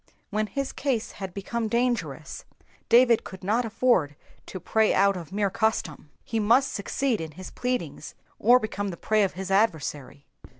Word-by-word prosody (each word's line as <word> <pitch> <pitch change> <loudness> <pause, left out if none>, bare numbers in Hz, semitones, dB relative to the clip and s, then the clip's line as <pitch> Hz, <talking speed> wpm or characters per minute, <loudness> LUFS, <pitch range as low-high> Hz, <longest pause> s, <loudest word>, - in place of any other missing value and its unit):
When 215 +1 0
his 275 +3 -3
case 255 -6 -2
had 190 -2 -7
become 220 +4 -3
dangerous, 240 +2 -2 0.5
David 235 -1 +5
could 190 0 -10
not 225 +6 +1
afford 210 - +1 0.3
to 185 - -6
pray 220 +5 +2
out 200 +1 +4
of 175 -2 -8
mere 200 0 0
custom, 220 -9 -1
he 225 - -2
must 240 +6 +3
succeed 230 +2 -1
in 160 -1 -7
his 185 +4 -9
pleadings, 175 - -4 0.2
or 240 +4 +6
become 215 -4 -3
the 180 -3 -5
prey 215 +4 +1
of 195 - +1
his 190 +1 -6
adversary. 150 - 0
210 Hz, 165 wpm, -26 LUFS, 185-235 Hz, 0.5 s, or